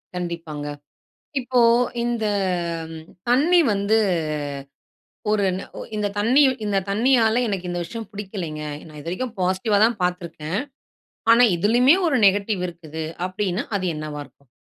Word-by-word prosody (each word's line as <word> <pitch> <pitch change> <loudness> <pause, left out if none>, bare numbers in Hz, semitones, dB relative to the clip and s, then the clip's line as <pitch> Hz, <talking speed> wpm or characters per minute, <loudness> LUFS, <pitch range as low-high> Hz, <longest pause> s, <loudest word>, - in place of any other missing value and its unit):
கண்டிப்பாங்க. 165 -4 -5 0.7
இப்போ, 250 -1 +1 0.4
இந்த 235 -2 -1 0.7
ம் 160 0 -9 0.2
தண்ணீ 320 +8 +5
வந்து, 200 +2 +2 1.3
ஒரு 210 -2 +2
ந - - -6 0.2
ஒ - - -6 0.2
இந்த 210 -1 0
தண்ணீ 250 +8 +4 0.2
இந்த 200 -1 0
தண்ணீயால, 230 +1 +3
எனக்கு 185 -3 -3
இந்த 175 0 -2
விஷயம் 225 +3 -7
பிடிக்கலைங்க. 185 -7 -5 0.2
நான் 155 -1 -12
இது 165 - -8
வரைக்கும் 235 +6 -3
பாசிட்டிவா 190 +3 +1
தான் 230 -3 -2
பார்த்திருக்கேன். 175 -1 -2 0.7
ஆனா, 245 +1 +7
இதிலயுமே 240 - +5
ஒரு 275 -4 +2
நெகட்டிவ் 200 -1 +2
இருக்குது 160 -2 -7 0.2
அப்பிடீன்னா, 185 +2 -2
அது 185 -1 -2
என்னவா 150 -1 -5
இருக்கும்? 140 +1 -23
200 Hz, 130 wpm, -23 LUFS, 170-230 Hz, 1.3 s, ஆனா